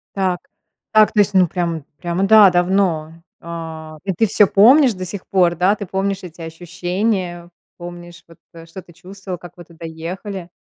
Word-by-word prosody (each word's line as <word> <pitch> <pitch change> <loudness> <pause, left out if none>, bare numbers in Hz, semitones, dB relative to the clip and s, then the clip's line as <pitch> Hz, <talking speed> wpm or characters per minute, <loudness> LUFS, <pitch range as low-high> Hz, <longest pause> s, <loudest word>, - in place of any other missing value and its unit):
Так. 185 -2 0 0.5
Так, 215 -1 +5
то 215 - +1
есть, 205 0 0
ну, 185 -2 +4
прям, 170 -3 -3
прямо, 175 +2 -2
да, 215 -1 +8
давно. 175 -3 0 0.3
Э, 160 -2 -8
и 195 - -2
ты 225 - +1
всё 205 +1 +4
помнишь 245 +7 +5
до 185 -1 -6
сих 190 +1 -7
пор, 180 -3 +2
да? 185 +5 +2
Ты 205 - -6
помнишь 195 +1 -2
эти 170 -1 -11
ощущения, 175 +2 -3 0.3
помнишь, 175 0 -10
вот, 165 -1 -18 0.2
э, 165 -1 -12
что 165 +3 -10
ты 175 - -19
чувствовал, 190 +1 -9
как 175 +1 -12
вы 175 - -10
туда 170 0 -12
ехали? 175 +3 -7
180 Hz, 180 wpm, -19 LUFS, 170-195 Hz, 0.5 s, да